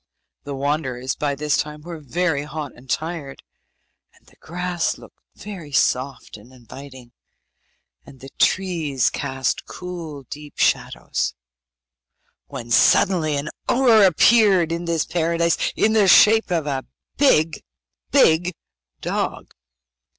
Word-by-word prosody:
The 140 Hz, -1 st, -5 dB
wanderers 135 Hz, -3 st, -2 dB
by 145 Hz, -1 st, -2 dB
this 150 Hz, +1 st, 0 dB
time 150 Hz, 0 st, -4 dB
were 165 Hz, 0 st, -8 dB
very 160 Hz, +1 st, -1 dB
hot 150 Hz, -1 st, -6 dB
and 130 Hz, +2 st, -18 dB
tired, 155 Hz, -4 st, -4 dB, 0.7 s
and -, -, -27 dB
the -, -, -23 dB
grass 175 Hz, 0 st, -3 dB
looked -, -, -16 dB, 0.2 s
very 185 Hz, -8 st, -9 dB
soft 130 Hz, -3 st, -1 dB
and 110 Hz, +5 st, -17 dB
inviting, 130 Hz, 0 st, -13 dB, 0.9 s
and 135 Hz, -, -16 dB
the 135 Hz, +1 st, -12 dB
trees 165 Hz, -9 st, +1 dB
cast 130 Hz, -2 st, -3 dB
cool 170 Hz, -6 st, -8 dB
deep 150 Hz, +3 st, -11 dB
shadows, -, -, 0 dB, 1.1 s
when 120 Hz, -4 st, -8 dB
suddenly 155 Hz, -, +3 dB
an 140 Hz, +2 st, -3 dB, 0.2 s
ogre 240 Hz, -4 st, +5 dB
appeared 190 Hz, -1 st, +4 dB
in 170 Hz, +1 st, -3 dB
this 165 Hz, -2 st, 0 dB
Paradise, 170 Hz, 0 st, 0 dB, 0.2 s
in 220 Hz, -, +2 dB
the 210 Hz, -3 st, +4 dB
shape 220 Hz, +3 st, +6 dB
of 165 Hz, -4 st, -1 dB
a 135 Hz, -3 st, -2 dB, 0.3 s
big, 165 Hz, -, +2 dB, 0.5 s
big 180 Hz, -, +3 dB, 0.5 s
dog! -, -, -3 dB
155 Hz, 120 wpm, -21 LUFS, 140-180 Hz, 1.1 s, shape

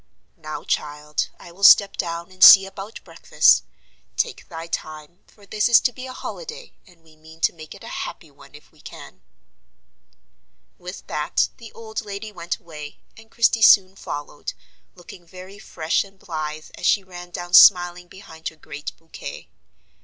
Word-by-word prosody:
"Now, 155 Hz, -2 st, -8 dB
child, 150 Hz, 0 st, -3 dB
I 175 Hz, -, -13 dB
will 190 Hz, +4 st, -14 dB
step 200 Hz, 0 st, +7 dB
down, 170 Hz, +1 st, -5 dB
and 185 Hz, -, 0 dB
see 195 Hz, -1 st, +11 dB
about 195 Hz, +3 st, -10 dB
breakfast. 165 Hz, -, +3 dB, 0.5 s
Take -, -, -3 dB
thy 165 Hz, 0 st, -7 dB
time; 155 Hz, 0 st, -7 dB
for 205 Hz, -, -21 dB
this 210 Hz, +3 st, 0 dB
is 235 Hz, -, +7 dB
to 250 Hz, -, +1 dB
be 255 Hz, +1 st, -9 dB
a -, -, -8 dB
holiday, 475 Hz, -, -9 dB
and 175 Hz, -3 st, -22 dB
we 160 Hz, -1 st, -21 dB
mean 160 Hz, +1 st, -17 dB
to -, -, +2 dB
make 155 Hz, -2 st, -12 dB
it -, -, -15 dB
a -, -, -10 dB, 0.2 s
happy -, -, -15 dB
one -, -, -18 dB
if -, -, -17 dB
we -, -, -23 dB
can." -, -, -12 dB, 1.6 s
With 180 Hz, +2 st, -9 dB
that 150 Hz, 0 st, -1 dB
the 230 Hz, -2 st, -12 dB
old 220 Hz, -1 st, -6 dB
lady 205 Hz, +1 st, -7 dB
went 170 Hz, -3 st, -5 dB
away, 150 Hz, -3 st, -11 dB, 0.2 s
and 225 Hz, 0 st, -17 dB
Christie 230 Hz, 0 st, +2 dB
soon 195 Hz, -3 st, +6 dB
followed, 145 Hz, -5 st, -7 dB, 0.4 s
looking 175 Hz, 0 st, -14 dB
very 185 Hz, +3 st, -13 dB
fresh 165 Hz, -5 st, -1 dB
and 195 Hz, -1 st, -18 dB
blithe 155 Hz, -3 st, -6 dB
as -, -, -1 dB
she 200 Hz, -, +3 dB
ran 175 Hz, -1 st, -11 dB
down 175 Hz, 0 st, -8 dB
smiling 175 Hz, -2 st, +6 dB
behind 165 Hz, -4 st, -11 dB
her 160 Hz, -, -6 dB
great 150 Hz, -1 st, -9 dB
bouquet. 165 Hz, -, -10 dB
175 Hz, 170 wpm, -22 LUFS, 160-200 Hz, 1.6 s, see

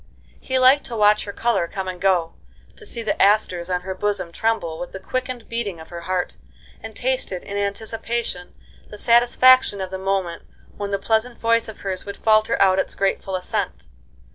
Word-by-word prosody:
He 260 Hz, -, -2 dB
liked 260 Hz, +3 st, +6 dB
to 235 Hz, -, -5 dB
watch 210 Hz, -1 st, +4 dB
her 200 Hz, -, -5 dB
color 200 Hz, -5 st, 0 dB
come 190 Hz, +1 st, -5 dB
and 180 Hz, -1 st, -6 dB
go, 180 Hz, -4 st, +2 dB, 0.4 s
to 435 Hz, -, -9 dB
see 235 Hz, -9 st, -3 dB
the 220 Hz, -, -1 dB
asters 190 Hz, -4 st, +3 dB
on 180 Hz, -1 st, 0 dB
her 190 Hz, +1 st, -4 dB
bosom 200 Hz, -2 st, -1 dB
tremble 170 Hz, -6 st, -1 dB
with 175 Hz, -, -6 dB
the 190 Hz, -, -6 dB
quickened 255 Hz, +4 st, -4 dB
beating 215 Hz, -7 st, -3 dB
of 160 Hz, -, -12 dB
her 170 Hz, -1 st, -7 dB
heart, 180 Hz, +1 st, -2 dB, 0.4 s
and 220 Hz, -1 st, -9 dB
tasted, 255 Hz, -8 st, -1 dB
in 200 Hz, -, -7 dB
anticipation, 215 Hz, -1 st, -3 dB, 0.3 s
the 210 Hz, -, -9 dB
satisfaction 240 Hz, 0 st, +5 dB
of 190 Hz, -1 st, -4 dB
the 190 Hz, -, -4 dB
moment 190 Hz, -3 st, -1 dB, 0.3 s
when 205 Hz, -1 st, -4 dB
that 200 Hz, -1 st, -2 dB
pleasant 230 Hz, +2 st, +1 dB
voice 230 Hz, 0 st, +2 dB
of 220 Hz, -, -11 dB
hers 190 Hz, -2 st, -3 dB
would 200 Hz, -, -7 dB
falter 215 Hz, +1 st, +3 dB
out 190 Hz, -1 st, +4 dB
its -, -, -2 dB
grateful 195 Hz, -1 st, -1 dB
assent. 180 Hz, -, -3 dB
200 Hz, 190 wpm, -22 LUFS, 185-230 Hz, 0.4 s, liked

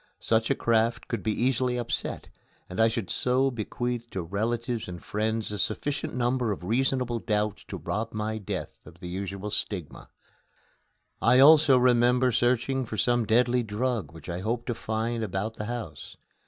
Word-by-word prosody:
Such 110 Hz, 0 st, +1 dB
a -, -, +3 dB
craft 115 Hz, 0 st, +1 dB
could 115 Hz, -4 st, -3 dB
be 110 Hz, -, 0 dB
easily 125 Hz, -1 st, +1 dB
upset, 120 Hz, -1 st, -3 dB, 0.4 s
and 90 Hz, +4 st, -2 dB
I 115 Hz, -, +6 dB
should 110 Hz, -4 st, -3 dB
so 130 Hz, +2 st, +2 dB
bequeath 120 Hz, +1 st, -3 dB
to 95 Hz, -, -4 dB
relatives 115 Hz, +5 st, -2 dB
and 90 Hz, -1 st, -7 dB
friends 110 Hz, +2 st, -2 dB
a 105 Hz, -, -4 dB
sufficient 140 Hz, +9 st, -2 dB
number 125 Hz, -2 st, +1 dB
of 95 Hz, -, -4 dB
reasonable 125 Hz, +3 st, 0 dB
doubts 105 Hz, -1 st, -1 dB
to -, -, -5 dB
rob 115 Hz, +2 st, -3 dB
my 110 Hz, +1 st, -3 dB
death 100 Hz, -, -5 dB
of 85 Hz, -, -15 dB
the 90 Hz, -, -7 dB
usual 100 Hz, +2 st, -4 dB
stigma. 95 Hz, -6 st, -4 dB, 1.1 s
I 120 Hz, +2 st, +5 dB
also 145 Hz, 0 st, +8 dB
remember 125 Hz, 0 st, +4 dB
searching 120 Hz, +3 st, +1 dB
for 110 Hz, -2 st, -6 dB
some 120 Hz, 0 st, +2 dB
deadly 120 Hz, +2 st, +3 dB
drug 115 Hz, -1 st, -2 dB
which 80 Hz, -1 st, -12 dB
I 85 Hz, 0 st, -3 dB
hoped 115 Hz, +4 st, -2 dB
to -, -, +1 dB
find 115 Hz, +1 st, -2 dB
about 105 Hz, +2 st, -3 dB
the 105 Hz, -, -4 dB
house. 105 Hz, -, -6 dB
115 Hz, 165 wpm, -27 LUFS, 105-125 Hz, 1.1 s, also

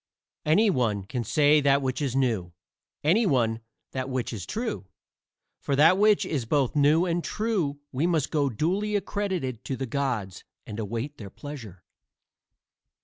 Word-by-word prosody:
Any 205 Hz, +7 st, +5 dB
one 110 Hz, -, 0 dB
can 120 Hz, +5 st, -4 dB
say 150 Hz, +5 st, +4 dB
that 140 Hz, 0 st, +3 dB
which 130 Hz, +2 st, -2 dB
is 135 Hz, -3 st, -1 dB
new; 110 Hz, -10 st, 0 dB, 0.5 s
any 200 Hz, +9 st, +3 dB
one 115 Hz, -7 st, +1 dB, 0.3 s
that 130 Hz, 0 st, -3 dB
which 130 Hz, -2 st, -2 dB
is 100 Hz, -5 st, -6 dB
true. 220 Hz, -, -3 dB, 0.7 s
For 140 Hz, -, -1 dB
that 160 Hz, +6 st, +6 dB
which 210 Hz, 0 st, +4 dB
is 140 Hz, -7 st, -2 dB
both 135 Hz, +2 st, +1 dB
new 150 Hz, +4 st, +4 dB
and 170 Hz, -1 st, -1 dB
true 200 Hz, -10 st, -1 dB
we 140 Hz, +6 st, 0 dB
must 160 Hz, -5 st, 0 dB
go 145 Hz, -3 st, +2 dB
duly 190 Hz, -, -1 dB
accredited 190 Hz, -, -2 dB
to 135 Hz, -, -3 dB
the 135 Hz, -, -3 dB
gods 120 Hz, -8 st, -2 dB, 0.2 s
and 105 Hz, +1 st, -7 dB
await 115 Hz, +7 st, -4 dB
their 100 Hz, -3 st, -8 dB
pleasure. 110 Hz, -7 st, -9 dB
140 Hz, 155 wpm, -26 LUFS, 120-170 Hz, 0.7 s, that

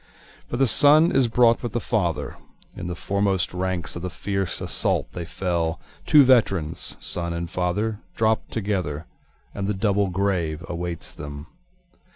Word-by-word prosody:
For 120 Hz, -, -2 dB
the 135 Hz, -, +4 dB
son 150 Hz, +6 st, +5 dB
is 130 Hz, -2 st, +3 dB
brought 115 Hz, 0 st, +4 dB
with 120 Hz, -3 st, -4 dB
the 120 Hz, -, 0 dB
father, 95 Hz, -9 st, -1 dB, 0.4 s
(In -, -, -6 dB
the 90 Hz, -, -4 dB
foremost 95 Hz, 0 st, 0 dB
ranks 90 Hz, -2 st, -2 dB
of 85 Hz, -, -5 dB
the 90 Hz, -, -3 dB
fierce 95 Hz, +1 st, -2 dB
assault -, -, +1 dB
they 85 Hz, -, -5 dB
fell, 85 Hz, -2 st, -2 dB, 0.3 s
Two 150 Hz, -2 st, +8 dB
veterans 95 Hz, -, +2 dB
son 85 Hz, -1 st, -3 dB
and 85 Hz, 0 st, -3 dB
father 90 Hz, +5 st, -1 dB, 0.2 s
dropt 110 Hz, 0 st, +1 dB
together, 95 Hz, -8 st, -2 dB, 0.5 s
And 100 Hz, -1 st, -3 dB
the 105 Hz, -, -1 dB
double 100 Hz, 0 st, +1 dB
grave 90 Hz, -3 st, -1 dB
awaits 85 Hz, -1 st, -4 dB
them.) 70 Hz, 0 st, -8 dB
95 Hz, 155 wpm, -24 LUFS, 85-110 Hz, 0.5 s, Two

